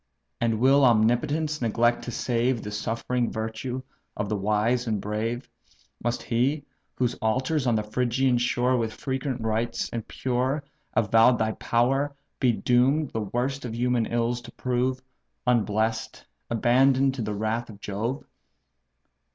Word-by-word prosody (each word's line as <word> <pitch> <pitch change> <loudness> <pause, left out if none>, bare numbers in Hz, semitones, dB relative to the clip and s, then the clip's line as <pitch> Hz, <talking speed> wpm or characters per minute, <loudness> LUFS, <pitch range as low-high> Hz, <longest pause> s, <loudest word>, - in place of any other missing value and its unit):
And 115 -2 +1
will 135 +3 +5
Omnipotence 130 +7 +2
neglect 120 +1 +2
to 120 - -4
save 120 0 0
The 105 - -5
suffering 115 +3 -1
virtue 115 +4 -4 0.3
of 105 -1 -2
the 105 - 0
wise 105 +5 +1
and 110 -2 0
brave? 110 +5 -3 0.6
Must 120 +1 -1
he, 135 +5 0 0.3
whose 125 -1 0
altars 130 +5 0
on 120 - +3
the 105 - 0
Phrygian 125 +3 +1
shore 125 +1 +2
With 115 -2 -2
frequent 130 -2 -3
rites, 115 +1 -1
and 115 -2 -4
pure, 130 +3 -1 0.3
avow'd 115 +3 +5
thy 110 0 +1
power, 135 +6 +1 0.2
Be 125 -3 +4
doom'd 130 +6 +2
the 110 - -2
worst 125 +7 -2
of 115 -2 -5
human 120 -1 +1
ills 120 +1 0
to 120 - -11
prove, 130 +1 -1 0.4
Unbless'd, 110 -2 0 0.2
abandon'd 130 +3 +3
to 130 - -4
the 105 -1 -2
wrath 110 +3 -2
of 100 -2 -11
Jove?" 110 +7 -3
120 Hz, 145 wpm, -26 LUFS, 110-130 Hz, 0.6 s, will